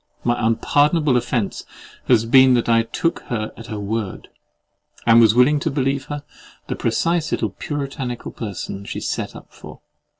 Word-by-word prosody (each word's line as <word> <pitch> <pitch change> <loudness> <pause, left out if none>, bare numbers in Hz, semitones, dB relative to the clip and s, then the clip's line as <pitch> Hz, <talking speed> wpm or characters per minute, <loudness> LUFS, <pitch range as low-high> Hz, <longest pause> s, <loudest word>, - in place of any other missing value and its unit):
My 120 - +2
unpardonable 145 +5 +2
offence 120 -3 -1 0.4
has 115 -3 +4
been 130 +2 +6
that 120 - 0
I 115 -1 +4
took 165 +8 -2
her 110 -3 -3
at 115 - -11
her 110 -3 -5
word, 105 -1 -4 0.8
and 115 0 +7
was 110 -1 +5
willing 135 +4 +4
to 160 +2 -1
believe 135 -1 -1
her 145 0 -6 0.4
the - - -4
precise 165 -2 0
little - - -1
puritanical 135 -5 -5
person 100 -2 -6
she - - -5
set - - -4
up - - -13
for. - - -12
125 Hz, 160 wpm, -21 LUFS, 115-145 Hz, 0.8 s, and